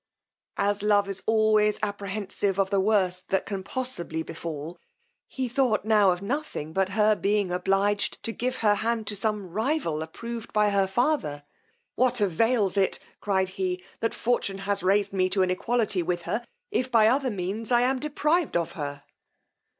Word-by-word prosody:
As 200 0 +1
love 205 -1 +3
is 195 -1 -5
always 215 -1 +3
apprehensive 200 -1 -2
of 195 0 +1
the 200 - +3
worst 190 -3 +1
that 190 - +1
can 195 -2 -4
possibly 185 -8 -4
befal, 165 +1 -6 0.5
he 260 -1 -3
thought 240 -4 +1
now 210 -3 +5
of 180 +1 0
nothing 205 - -3
but 190 +1 +1
her 215 0 +5
being 205 -2 0
obliged 195 +3 0
to 230 - -2
give 250 +3 -2
her 205 - +6
hand 225 +1 -1
to 210 - -1
some 205 -2 -2
rival 220 - -1
approved 230 +8 -7
by 210 -1 +3
her 195 -1 +2
father: 190 - 0 0.5
what 250 0 +2
avails 205 +1 +2
it, 195 -1 +2 0.2
cried 190 -2 0
he, 185 -1 -3 0.2
that 230 - -1
fortune 225 -5 0
has 200 0 0
raised 200 +1 +2
me 185 -1 +2
to 190 0 +2
an 185 - +1
equality 210 0 +1
with 175 0 -2
her, 230 +7 -2 0.3
if, 255 -11 0
by 225 -3 +5
other 260 +4 +3
means, 205 +3 -4
I 240 0 +5
am 260 +1 +1
deprived 300 - +1
of 170 -2 -2
her! 145 -2 -6
205 Hz, 170 wpm, -26 LUFS, 185-230 Hz, 0.5 s, her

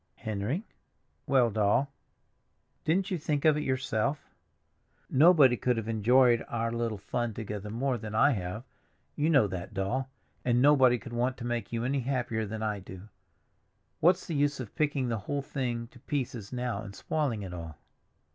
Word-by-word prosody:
"Henry?" 110 - -3 0.6
"Well, 130 -4 +4
Doll." 110 +6 +2 0.9
"Didn't 180 +5 +1
you 180 - -1
think 150 -1 -1
of 155 -1 +6
it, 150 - -1
yourself?" 130 0 -1 0.8
"Nobody 145 -3 +6
could 125 0 0
have 110 -1 -3
enjoyed 120 +2 +4
our 115 0 -1
little 115 -2 -2
fun 115 +3 -3
together 105 -1 -5
more 125 +3 -1
than 110 0 -6
I 145 +6 +5
have, 100 0 -3 0.5
you 150 +2 +1
know 135 -9 +5
that, 95 +1 -6
Doll; 125 +8 -1 0.3
and 120 -1 +2
nobody 130 -3 +5
could 120 +1 -10
want 125 +2 0
to 120 - -6
make 120 -1 -3
you 115 0 -2
any 135 +3 0
happier 120 -4 -1
than 110 +2 -5
I 105 -2 -1
do. 95 +2 -11 0.9
What's 175 +3 +3
the 170 - -4
use 145 -1 +1
of 120 -5 -7
picking 145 -4 0
the 115 -2 -1
whole 140 +8 -3
thing 120 -4 -3
to 125 - -17
pieces 125 -7 -4
now 125 -4 -2
and 100 -2 -9
spoiling 135 -8 -1
it 90 -2 -7
all?" 80 -3 -7
120 Hz, 170 wpm, -29 LUFS, 110-140 Hz, 0.9 s, of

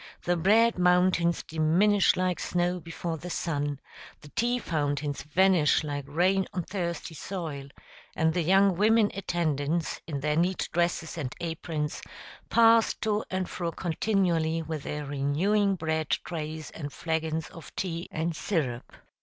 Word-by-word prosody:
the 175 - +1
bread 215 +5 +4
mountains 180 -1 +3
diminish 175 +6 +3
like 185 -1 0
snow 180 0 0
before 165 0 -5
the 180 - -7
sun, 145 -5 -2 0.4
the 150 - -13
tea 240 +8 0
fountains 145 - -2
vanish 170 0 +3
like 145 -2 -4
rain 185 +6 +2
on 180 - -2
thirsty 170 -3 -4
soil, 155 -6 -5 0.5
and 160 0 +2
the 175 - +1
young 190 +3 +4
women 215 +2 +4
attendants, 165 -4 -1
in 145 -4 -3
their 150 +1 0
neat 180 +3 +1
dresses 170 -1 0
and 130 -4 -4
aprons, 160 -2 -3 0.5
pass 230 -1 +5
to 215 0 -1
and 185 -1 -2
fro 170 -2 -3
continually 165 -2 0
with 155 -1 -4
their 150 +1 -4
renewing 170 +9 +1
bread 160 -2 -2
trays 155 -2 -3
and 145 -3 -6
flagons 160 +1 -2
of 165 -5 -11
tea 170 -2 -3
and 160 +1 -2
syrup. 135 - -2
170 Hz, 140 wpm, -28 LUFS, 155-185 Hz, 0.5 s, pass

